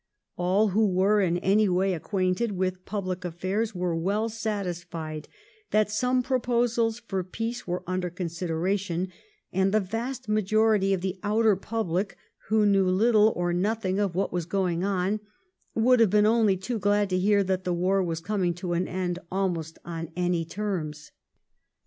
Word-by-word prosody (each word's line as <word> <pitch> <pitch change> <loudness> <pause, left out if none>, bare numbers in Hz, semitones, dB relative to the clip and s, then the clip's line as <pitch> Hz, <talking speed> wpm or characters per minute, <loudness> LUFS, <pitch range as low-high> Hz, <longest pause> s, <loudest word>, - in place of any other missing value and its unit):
All 190 +4 +2
who 215 +3 +3
were 195 +3 +3
in 175 -2 +1
any 200 +3 +3
way 185 +1 +2
acquainted 185 +5 -1
with 185 -1 -2
public 185 -3 -3
affairs 185 +5 -2
were 180 -1 -1
well 200 +7 0
satisfied 175 -8 -4 0.4
that 215 -1 +2
some 250 +3 +1
proposals 240 -3 +1
for 195 -5 -3
peace 225 +6 -5
were 180 0 -2
under 185 0 -2
consideration, 175 +2 -2 0.4
and 190 +1 +2
the 215 - +4
vast 235 +6 -4
majority 215 -1 +2
of 180 - -6
the 190 0 -3
outer 215 0 +3
public, 195 -2 -2 0.3
who 215 +1 +3
knew 195 -2 +4
little 215 +3 +4
or 175 0 0
nothing 195 +1 0
of 195 -4 0
what 195 - -1
was 175 -2 -2
going 180 -3 0
on, 195 +1 0 0.6
would 245 +2 +4
have 225 -3 +5
been 210 +2 +4
only 215 -3 +3
too 220 +5 -3
glad 205 +1 +2
to 185 - +2
hear 200 +1 +3
that 190 0 -1
the 180 - -1
war 185 +3 +2
was 165 -3 -2
coming 185 -2 0
to 175 0 -3
an 175 +2 0
end 180 -1 -2
almost 175 -4 -2
on 165 -1 -5
any 175 -1 0
terms. 165 -5 -4
190 Hz, 160 wpm, -27 LUFS, 180-215 Hz, 0.6 s, have